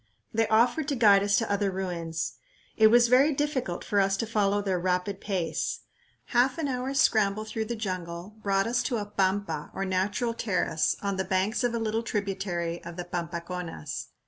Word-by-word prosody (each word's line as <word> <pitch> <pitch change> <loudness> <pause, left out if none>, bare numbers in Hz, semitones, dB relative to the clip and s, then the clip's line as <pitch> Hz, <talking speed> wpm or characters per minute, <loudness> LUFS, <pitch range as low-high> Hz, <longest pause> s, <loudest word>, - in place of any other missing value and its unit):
They 225 0 +2
offered 240 +7 +3
to 285 - 0
guide 205 -5 +6
us 200 0 +2
to 225 - 0
other 200 0 +1
ruins. 175 -4 -3 0.4
It 220 - +6
was 240 +2 +6
very 270 +5 +4
difficult 270 - -2
for 205 - +1
us 195 0 +2
to 230 - -1
follow 205 -2 +1
their 195 -3 -1
rapid 185 +2 -1
pace. 180 -6 -2 0.5
Half 250 +2 +3
an 320 -3 -1
hour's 265 +1 -1
scramble 215 -1 +3
through 220 0 -3
the 235 - -3
jungle 185 -2 -5
brought 195 -1 +1
us 240 +1 +1
to 240 - -1
a 210 - -3
pampa 200 0 -1
or 195 - -2
natural 195 +5 0
terrace 185 -8 0
on 200 -1 -1
the 190 - 0
banks 190 +5 0
of 240 -1 +1
a - - 0
little 225 0 -1
tributary 195 -6 -3
of 170 0 -8
the 175 - -4
Pampaconas. 170 - -5
200 Hz, 185 wpm, -28 LUFS, 185-230 Hz, 0.5 s, guide